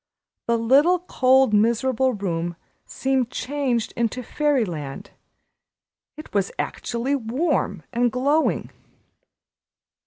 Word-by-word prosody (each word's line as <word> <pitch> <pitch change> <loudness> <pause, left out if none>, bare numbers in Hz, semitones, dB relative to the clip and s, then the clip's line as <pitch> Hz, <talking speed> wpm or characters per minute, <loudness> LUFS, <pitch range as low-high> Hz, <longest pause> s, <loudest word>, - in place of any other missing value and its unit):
The 235 0 +2
little, 275 +10 +4
cold, 265 -8 +3
miserable 235 +4 +2
room 175 -4 -3 0.3
seemed 265 -2 0
changed 255 -3 -2
into 235 +2 -1
Fairyland. 220 - -2 1.1
It 310 - -11
was 200 -2 0
actually 240 +4 -2
warm 250 - -1
and 240 0 +2
glowing. 285 +6 +1
250 Hz, 90 wpm, -23 LUFS, 220-270 Hz, 1.1 s, little